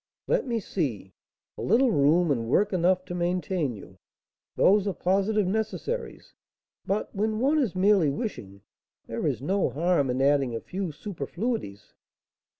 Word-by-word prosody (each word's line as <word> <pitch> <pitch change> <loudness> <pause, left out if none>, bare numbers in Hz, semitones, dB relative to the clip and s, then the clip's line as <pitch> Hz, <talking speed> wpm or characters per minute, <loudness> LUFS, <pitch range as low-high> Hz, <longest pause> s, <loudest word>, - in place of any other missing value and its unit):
"Let - - 0
me 235 -2 0
see: 130 - -3 0.5
a - - -4
little 240 +4 +3
room, 155 +1 +3
and 115 -4 -1
work 200 - +2
enough 185 +1 +2
to 175 - -6
maintain 175 - -1
you, 95 -2 -13 0.6
those 205 +1 +4
are 200 - 0
positive 195 +3 +1
necessaries; 220 - -3 0.5
but, 200 +2 -2
when 215 +2 -1
one 285 +5 +2
is 235 -10 0
merely 190 -4 +4
wishing, 105 - -5 0.4
there - - -3
is - - -2
no 190 +5 +1
harm 165 -2 +1
in 125 +1 -1
adding 135 -3 +2
a - - -2
few 185 +3 -4
superfluities. 170 - -5
185 Hz, 150 wpm, -26 LUFS, 140-210 Hz, 0.6 s, those